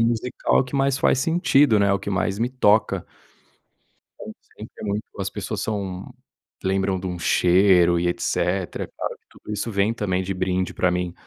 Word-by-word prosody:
musical 120 +3 +1
que 130 - -10
mais 135 0 +1
faz 130 - +2
sentido, 150 - +3
né. 100 -1 +3
O 100 - +1
que 100 - -6
mais 95 +1 -1
me 120 - +1
toca. 110 -4 +2 1.1
Falam - - -8 0.2
sempre - - -10
muito, 105 +1 -2 0.2
as - - -3
pessoas - - -5
são 95 -4 -4 0.5
lembram 95 0 0
de 95 - -6
um 90 -1 -4
cheiro 90 0 +4
e 85 +1 0
etc. 90 +1 -2
Claro - - -4
que - - -50
tudo - - -10
isso 105 +2 -3
vem 100 +2 +1
também 95 -5 -1
de 95 - -3
brinde 90 0 -1
pra 90 - +1
mim, 90 -1 -2
100 Hz, 175 wpm, -23 LUFS, 90-115 Hz, 1.1 s, cheiro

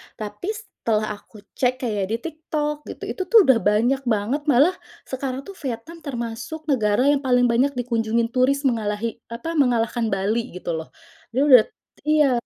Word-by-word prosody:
Tapi 215 - -6
setelah 220 - -2
aku 210 -1 -17
cek 255 0 0
kayak 210 -5 -1
di 225 - +1
TikTok, 300 -1 -4
gitu, - - -8
itu 375 - -3
tuh 450 +1 +7
udah 260 -4 +6
banyak 230 +7 +2
banget. 225 +6 0
Malah 290 +7 +5 0.3
sekarang 260 0 -4
tuh 395 - -10
Vietnam 255 +8 -6
termasuk 245 +3 -5
negara 220 -5 +2
yang 285 - +2
paling 250 -2 +3
banyak 260 +4 +2
dikunjungi 230 -2 0
turis, 265 +3 +2
mengalahi, 225 -3 -1
apa, 235 +8 -5
mengalahkan 240 -4 +2
Bali, 215 +3 -1
gitu 180 -1 -4
loh. 160 0 -6 0.5
Dia 270 - +3
udah 250 -5 +9 0.4
iya, 305 -3 +4
245 Hz, 160 wpm, -23 LUFS, 225-280 Hz, 0.5 s, udah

